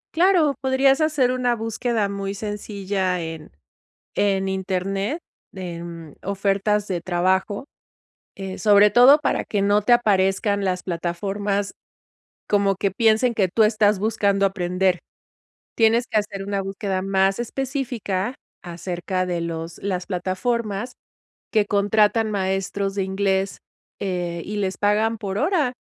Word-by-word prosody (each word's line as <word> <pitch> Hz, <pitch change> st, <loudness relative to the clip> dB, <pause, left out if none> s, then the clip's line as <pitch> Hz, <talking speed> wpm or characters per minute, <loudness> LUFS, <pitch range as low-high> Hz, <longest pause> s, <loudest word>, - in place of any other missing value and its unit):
Claro, 335 Hz, -5 st, +4 dB
podrías 270 Hz, +2 st, +3 dB
hacer 290 Hz, -5 st, +2 dB
una 245 Hz, -2 st, 0 dB
búsqueda 225 Hz, -1 st, -1 dB
muy 200 Hz, 0 st, -4 dB
sencilla 200 Hz, -3 st, -2 dB
en 160 Hz, -1 st, -7 dB, 0.7 s
en 195 Hz, -1 st, +1 dB
Internet 195 Hz, -, -2 dB, 0.3 s
de, 175 Hz, -3 st, -6 dB
mm, 165 Hz, -3 st, -9 dB
ofertas 200 Hz, +1 st, 0 dB
de 180 Hz, -2 st, -2 dB
trabajo, 190 Hz, -, 0 dB, 0.7 s
eh, 190 Hz, -1 st, -6 dB
sobre 205 Hz, -1 st, +6 dB
todo 250 Hz, +7 st, +7 dB
para -, -, 0 dB
que 205 Hz, -2 st, -1 dB
no 205 Hz, +1 st, +3 dB
te 210 Hz, -, 0 dB
aparezcan 200 Hz, -3 st, +3 dB
las 180 Hz, -1 st, -1 dB
plataformas, 195 Hz, +4 st, -2 dB, 0.8 s
como 200 Hz, -1 st, +2 dB
que 195 Hz, +1 st, 0 dB
piensen 225 Hz, +2 st, +3 dB
que 195 Hz, -4 st, +2 dB
tú 225 Hz, -, +5 dB
estás 210 Hz, -2 st, +3 dB
buscando 200 Hz, -2 st, +1 dB
aprender. 180 Hz, -1 st, 0 dB, 0.7 s
Tienes 230 Hz, +1 st, +3 dB
que 215 Hz, -, +1 dB
hacer 200 Hz, -2 st, -4 dB
una 200 Hz, 0 st, -2 dB
búsqueda 195 Hz, 0 st, -3 dB
más 195 Hz, 0 st, +1 dB
específica 245 Hz, -4 st, -3 dB, 0.3 s
acerca 180 Hz, +1 st, -3 dB
de 175 Hz, -1 st, -2 dB
los 165 Hz, 0 st, -5 dB
las 185 Hz, -2 st, -3 dB
plataformas 205 Hz, +5 st, -2 dB, 0.6 s
que 215 Hz, -2 st, +3 dB
contratan 210 Hz, +2 st, +2 dB
maestros 195 Hz, 0 st, -1 dB
de 200 Hz, -, 0 dB
inglés, 190 Hz, 0 st, 0 dB, 0.4 s
eh, 175 Hz, -3 st, -2 dB
y 210 Hz, +1 st, -4 dB
les 195 Hz, -2 st, -2 dB
pagan 215 Hz, +2 st, +1 dB
por 195 Hz, -2 st, -4 dB
hora, 300 Hz, -, +1 dB
200 Hz, 130 wpm, -23 LUFS, 190-220 Hz, 0.8 s, todo